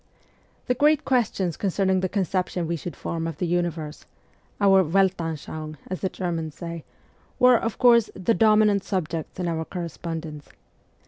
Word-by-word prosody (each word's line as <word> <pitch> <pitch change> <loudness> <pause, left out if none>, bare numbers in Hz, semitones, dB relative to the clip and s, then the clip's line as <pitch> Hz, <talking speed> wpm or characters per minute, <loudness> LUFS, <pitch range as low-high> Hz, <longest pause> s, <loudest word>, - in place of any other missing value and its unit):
The 250 - +1
great 295 +3 +3
questions 205 - 0
concerning 190 -1 +1
the 185 0 -1
conception 185 -2 -1
we 170 +1 -1
should 170 +2 -6
form 165 -1 -3
of 165 -3 -5
the 180 - -1
universe 170 -3 -2 0.5
our 195 -2 +5
Weltanschauung, 160 -4 -1
as 185 - -3
the 190 - 0
Germans 165 -4 -4
say 170 -2 -6 0.5
were, 250 -2 +6
of 225 -2 -3
course, 235 -3 +5
the 190 +5 +1
dominant 215 -3 +4
subjects 170 -3 -3
in 180 - -1
our 165 -1 -1
correspondence. 165 -3 -6
180 Hz, 145 wpm, -25 LUFS, 165-200 Hz, 0.5 s, were